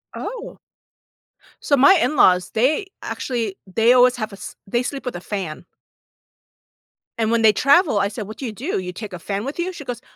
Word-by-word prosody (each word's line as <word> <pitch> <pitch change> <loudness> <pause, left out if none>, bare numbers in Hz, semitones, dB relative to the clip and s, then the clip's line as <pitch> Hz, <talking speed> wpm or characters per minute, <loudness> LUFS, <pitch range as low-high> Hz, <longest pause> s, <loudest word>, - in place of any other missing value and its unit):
Oh. - - -7 1.1
So, 285 - +3
my 280 +9 +7
in-laws, 185 - +3
they 285 - +1 0.2
actually 230 -6 -3 0.2
they 230 +3 +4
always 250 0 +5
have 215 -3 -5
a - - -7
s 195 - -9
they 240 +5 0
sleep 270 +2 -5
with 250 - -4
a 175 - -6
fan. 185 -6 -5 1.5
And, 225 -1 +1
when 230 -1 +2
they 220 -1 +6
travel, 275 - +4
I 200 - +2
said, 205 0 -6
"What 215 - -9
do 270 - -6
you 230 - -3
do, 250 - -3
you 180 -1 -6
take 205 +1 -8
a 180 - -6
fan 200 +3 -4
with 280 +5 -6
you?" 365 +2 -2
She 320 - -9
goes, 245 -1 -5
230 Hz, 200 wpm, -21 LUFS, 200-275 Hz, 1.5 s, my